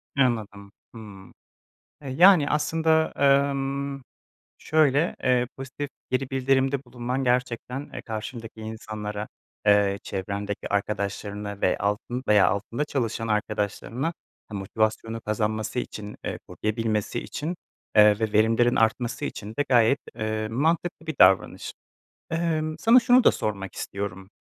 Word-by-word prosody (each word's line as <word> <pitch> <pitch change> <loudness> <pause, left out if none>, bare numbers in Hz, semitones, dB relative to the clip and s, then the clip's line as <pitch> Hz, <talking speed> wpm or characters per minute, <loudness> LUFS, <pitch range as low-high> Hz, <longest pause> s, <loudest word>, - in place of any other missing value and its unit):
Anladım, 110 -6 0 0.2
hımm. 100 -4 -11 0.7
E, 140 -3 -7
yani 170 +1 +6
aslında, 160 +1 +2
emm, 140 0 +1 0.6
şöyle, 155 +1 +2
eee, 125 -1 +3
pozitif 135 +2 -6 0.2
geri 130 0 -1
bildirimde 135 +1 +1
bulunman 125 +2 -3
gerçekten, 125 +2 -1
eee, - - -6
karşındaki 110 0 -7
insanlara, 110 -1 -5 0.4
eee, 100 -1 +4
çevrendeki 100 +1 -4
arkadaşlarını 100 0 -3
ve 90 - +2
altın 105 +5 -2
veya 105 -2 +6
altında 115 +7 -2
çalışan 115 -5 -2
arkadaşlarını, 105 +5 -2 0.4
ha, 110 - -9
motivasyonu 110 +3 -1
kazanması 110 +1 -2
için, 105 -3 -5
eee, - - -3
koruyabilmesi 110 +1 -2
için, 165 +4 -5 0.4
eee, 105 -1 +7
ve 110 -2 -1
verimlerin 115 +3 +3
artması 115 +5 +1
için 105 -7 -5
de 145 - +2
gayet, 120 +2 +4 0.2
eee, 110 0 -2
mantıklı 160 +7 -1
bir 160 - -3
davranış. 95 +1 +4 0.6
Emm, 160 -2 -1
sana 230 +8 +7
şunu 245 +1 +5
da - - +7
sormak 100 -3 -4
istiyorum, 95 -1 -5
115 Hz, 120 wpm, -25 LUFS, 105-140 Hz, 0.7 s, eee